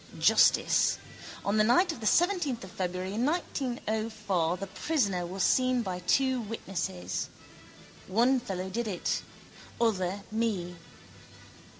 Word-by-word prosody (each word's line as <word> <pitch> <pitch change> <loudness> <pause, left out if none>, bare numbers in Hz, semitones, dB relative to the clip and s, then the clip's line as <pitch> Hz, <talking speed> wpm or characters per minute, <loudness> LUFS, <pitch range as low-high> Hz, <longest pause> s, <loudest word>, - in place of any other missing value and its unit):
Justice. - - +4 0.5
On 200 +2 +1
the 215 - +5
night 255 - +4
of 285 - -8
the 220 - -2
seventeenth 345 - +2
of 190 - -10
February 185 +1 -3
1904 220 - -1
the 195 - -4
prisoner 195 - -1
was 185 +1 -2
seen 255 -1 +3
by 185 -3 -3
two 260 +7 +2
witnesses. 165 - -4 0.8
Other 245 +6 +4
fellow 190 -6 -4
did 235 +3 -2
it: 185 -4 -1 0.6
other 200 -4 0
me. 210 -6 -1
215 Hz, 115 wpm, -29 LUFS, 185-245 Hz, 0.8 s, the